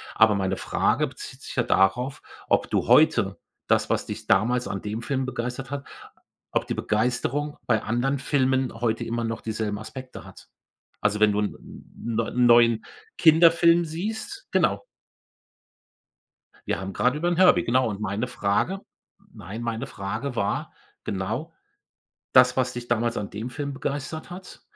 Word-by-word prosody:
Aber 110 -1 +6
meine 95 -1 -1
Frage - - +1
bezieht - - -10
sich - - -8
ja - - +3
darauf, 125 +8 +1 0.3
ob - - +2
du - - 0
heute - - +4 0.3
das, - - +2
was - - 0
dich - - -6
damals 120 +6 +2
an 100 - -4
dem 105 +3 -4
Film 135 -1 -1
begeistert 125 +1 -4
hat, 140 -1 -4 0.7
ob - - 0
die - - -1
Begeisterung 125 +6 -1
bei 110 -3 +2
anderen 125 +5 0
Filmen 130 -2 +1
heute 115 -1 -1
immer 115 0 -2
noch 115 0 -3
dieselben 110 -2 -3
Aspekte 130 +4 -9
hat. - - -14 0.5
Also, 105 0 +1
wenn 105 -1 +5
du 105 - 0
'n 105 - -1
'n 115 -1 -9
neu 115 - -1
neuen 120 -2 +5 0.3
Kinderfilm 170 +1 +6
siehst 220 - -5
genau. - - +1 1.8
Wir - - -1
haben 95 0 -5
grade 125 +4 +1
über 170 +3 -1
'n 175 - +1
Herbie 185 0 +5
genau. 120 -2 +2
Meine 105 +3 -2
Frage 125 - 0 0.6
nein, 105 +2 -7
meine 115 -1 -3
Frage 110 +7 -4
war 100 - -2 0.3
genau: 110 - -3 0.8
Das, 125 0 +6
was 125 -1 +1
dich 120 -1 -7
damals 120 0 0
an 100 - -4
dem 110 +5 -5
Film 140 +2 -4
begeistert 145 +4 -4
hat, 180 +1 -10
120 Hz, 155 wpm, -25 LUFS, 110-140 Hz, 1.8 s, Aber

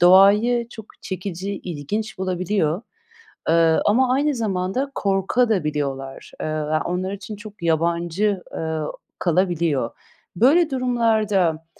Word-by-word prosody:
doğayı 210 +7 +6
çok 220 -3 -10 0.2
çekici, 190 +1 -4
ilginç 185 +7 -4
bulabiliyor, 185 -1 0 0.7
eee, 165 -1 +4
ama 250 +4 +3
aynı 290 +1 +1
zamanda 215 +4 -1
korkabiliyorlar 150 - -1
da. - - -3
Eee, - - -1
ya 155 0 -1
onlar 185 +2 -2
için 205 +2 -7
çok 210 -2 -12
yabancı, 170 +4 +1
eee, 160 -1 -2 0.4
kalabiliyor. 170 -8 +1 0.5
Böyle 300 - +4
durumlarda, 220 -10 +1
190 Hz, 105 wpm, -22 LUFS, 165-220 Hz, 0.7 s, doğayı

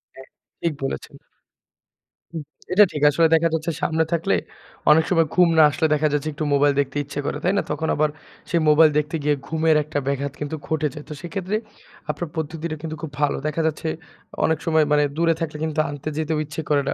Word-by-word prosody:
হ্যাঁ, 130 0 -12 0.3
ঠিক 170 -2 0
বলেছেন। 135 - -4 1.2
হুম, 160 -2 -4 0.3
এটা 210 +2 +8
ঠিক। 150 - -4
আসলে 165 +3 +3
দেখা 165 +1 +3
যাচ্ছে 160 +1 -1
সামনে 160 0 +1
থাকলে 160 - +1 0.6
অনেক 160 +1 +6
সময় 165 -3 +3
ঘুম 180 -2 +5
না 155 - +8
আসলে 160 +1 +1
দেখা 155 +1 +2
যাচ্ছে 145 +1 -1
একটু 155 - -4
মোবাইল 140 0 +4
দেখতে 140 0 -1
ইচ্ছে 145 +1 -6
করে। 145 - -2
তাই 180 +2 +2
না? - - +1
তখন 160 +2 -2
আবার 155 0 +2 0.4
সেই 170 -2 +2
মোবাইল 155 +1 +7
দেখতে 150 +2 0
গিয়ে 150 0 +2
ঘুমের 160 0 +2
একটা 150 0 -5
ব্যাঘাত 140 0 -1
কিন্তু 150 +1 -3
ঘটে 155 -1 0
যায়। 150 -1 -8
তো - - -5
সেক্ষেত্রে 190 +3 -3 0.5
আপনার 175 - -2
পদ্ধতিটা 160 +1 -3
কিন্তু 160 -1 -5
খুব 160 -4 -6
ভালো। 145 - +2
দেখা 155 +2 -1
যাচ্ছে 160 +1 -3 0.6
অনেক 160 -1 +2
সময় 160 -1 +3
মানে 150 0 +4
দূরে 165 0 +3
থাকলে 155 -2 -3
কিন্তু 155 -1 -2
আনতে 145 +1 -5
যেতেও 160 0 -1
ইচ্ছে 155 +2 -5
করে 145 -1 +3
না। - - 0
155 Hz, 200 wpm, -22 LUFS, 150-165 Hz, 1.2 s, এটা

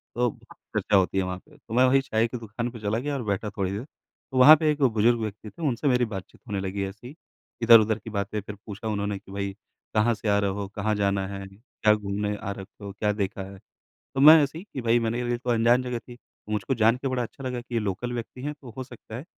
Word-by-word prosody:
तो 120 +1 +2 0.2
चर्चा 105 - -2
होती 95 0 +3
है 95 - +3
वहाँ 90 0 -3
पे, - - -21
तो 110 - -11
मैं 125 +2 +5
वही 135 +1 +4
चाय 115 -3 +1
की 125 - -5
दुकान 115 +1 -4
पे 115 - -9
चला 105 +1 -1
गया 145 +3 -3
और 130 - -3
बैठा 100 +1 -1
थोड़ी 95 -2 0
देर। 100 +4 -4
तो 135 -1 -12
वहाँ 145 +5 +10
पे 155 0 +1
एक 150 -1 -3
बुज़ुर्ग 115 -1 +3
व्यक्ति 105 0 -5
थे 170 - -14
उनसे 130 +2 -1
मेरी 125 -2 +3
बातचीत 95 -4 -8
होने 100 -3 -2
लगी 95 +1 -3
ऐसी 105 +5 -10
ही, 140 - -11 0.5
इधर-उधर 110 -2 +6
की 110 - -9
बातें 100 0 -2
फिर 105 +1 -8
पूछा 105 +1 -6
उन्होंने 100 -1 -1
कि 95 - -16
भई 100 0 -3 0.4
कहाँ 110 +2 +3
से 110 0 -6
आ 100 - +4
रहे 100 -1 +1
हो, 100 0 -4
कहाँ 110 +1 0
जाना 100 -1 +1
है? 100 0 -6
क्या 105 +1 0
घूमने 105 0 -2
आ 100 - -5
रखे 100 +2 -10
हो, 100 - -5
क्या 105 +1 0
देखा 100 0 -3
है? 100 - -11 0.6
तो 135 - 0
मैं 155 +2 +9
ऐसे 145 +3 -2
ही 175 - -9
कि 130 - -4
भई 120 0 +3
मेरे 115 +1 -1
लिए 120 0 0
तो 125 0 -3
अनजान 120 +2 +4
जगह 125 -1 -3
थी। 120 +1 -13 0.3
मुझको 105 +3 -1
जान 115 0 +4
के 135 +2 -3
बड़ा 130 -1 -1
अच्छा 125 +3 -8
लगा 125 -1 -3
कि 120 0 -9
ये 115 - +2
लोकल 105 +4 -3
व्यक्ति 120 +1 -6
हैं, 150 +2 -3
तो 135 -4 -12
हो 130 - -4
सकता 120 -3 -10
है 130 - -7
110 Hz, 260 wpm, -26 LUFS, 100-125 Hz, 0.6 s, वहाँ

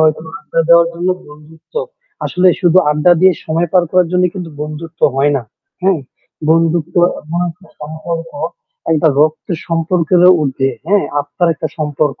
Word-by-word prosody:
হয়তো 155 0 +3 0.2
আড্ডা 155 +2 -2
দেওয়ার 170 0 +6
জন্য 175 +2 -3 0.2
বন্ধুত্ব। 155 - -17 0.5
আসলে 180 +1 +2
শুধু 180 0 +4
আড্ডা 150 +4 +4
দিয়ে 190 0 +6
সময় 165 +2 -1
পার 180 -2 +5
করার 180 -2 +3
জন্য 180 0 +2
কিন্তু 180 -3 -6
বন্ধুত্ব 160 +2 -8
হয় 145 +2 +2
না। 130 - -3 0.4
হ্যাঁ? 185 -4 +2 0.5
বন্ধুত্ব 165 0 +1 0.3
এমন 165 +3 -4
একটা 180 +5 -17
সম্পর্ক 160 +2 -6 0.6
একটা 160 +1 +3
রক্তের 155 +2 0
সম্পর্কেরও 170 +2 +3
উর্ধে, 135 -1 0 0.2
হ্যাঁ? 200 +2 +2 0.2
আত্মার 170 +4 -1
একটা 160 - -4
সম্পর্ক। 150 -1 -1
165 Hz, 150 wpm, -15 LUFS, 155-175 Hz, 0.6 s, দেওয়ার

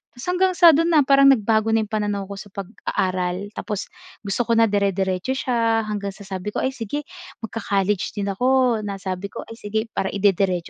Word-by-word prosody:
Tapos 245 - -9
hanggang 370 +1 +2
sa 340 -2 +8
do'n 330 +2 +2
na 295 - +6
parang 275 0 +5
nagbago 225 -3 +3
na 225 - +2
'yong 215 - -10
pananaw 205 -2 -1
ko 200 - -7
sa 205 - -9
pag-aaral. 185 -1 -3
Tapos 210 -2 -5 0.3
gusto 200 +4 -1
ko 230 - +2
na 225 -1 +4
dire-diretso 195 +3 0
siya 230 -3 +1
hanggang 205 -2 -4
sa 205 - -12
sabi 190 +1 -6
ko, - - -1
"Ay 260 - +1
sige, 265 +4 -5 0.4
magka-college 200 -3 -1
din 200 -1 -2
ako," 250 +1 +2
na 205 -2 -4
sabi 190 0 -4
ko, - - -8
"Ay 225 - -11
sige, 220 +2 -3
para 190 - -1
ide-diretso 195 -2 +2
210 Hz, 195 wpm, -22 LUFS, 195-235 Hz, 0.4 s, sa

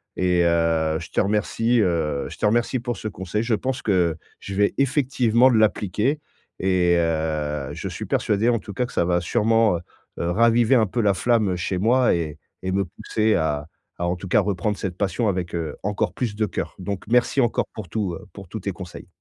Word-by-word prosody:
et 90 -1 +2
heu, 80 -2 +2
je 80 - -9
te - - 0
remercie, 105 +4 +1
heu, 80 -7 0
je - - -10
te - - -1
remercie 120 +4 +2
pour 120 0 -4
ce 110 - -5
conseil, 95 +2 -3
je 115 0 0
pense 130 +2 -3
que 90 -6 +2 0.2
je 100 - -7
vais 100 0 +2
effectivement 130 -3 +3
l'appliquer 110 - +1 0.4
et 90 -2 +3
heu, 75 -4 -1
je - - -5
suis - - -6
persuadé 105 +3 +1
en 115 -2 +2
tout 100 - -9
cas 125 +6 0
que - - -11
ça - - +1
va 85 0 +2
sûrement, 115 +1 +2
heu - - -8 0.4
heu, 85 0 0
raviver 115 +4 +4
un 110 -4 +4
peu 120 +5 -1
la 100 -2 +3
flamme 110 -2 +1
chez 90 +2 -2
moi 120 +4 +3
et 80 -3 -3 0.3
et 95 - -1
me 100 0 +1
pousser 110 +5 0
à 75 -2 -1 0.3
à 85 - 0
en 90 - 0
tout 90 +2 -8
cas - - +4
reprendre 100 +1 -1
cette 95 -3 -4
passion 105 +3 0
avec, 90 -3 -2
heu, 80 -3 -3
encore 105 0 -1
plus 115 -5 -3
de 110 0 +1
cœur. - - -4
Donc 95 +1 -4
merci 125 +3 +3
encore 120 -2 +1
pour 105 -6 -8
tout, 100 -2 -2
heu, 95 - -11
pour 100 -3 -10
tous 110 - -6
tes 100 - -2
conseils. 90 0 -9
100 Hz, 210 wpm, -23 LUFS, 85-115 Hz, 0.4 s, raviver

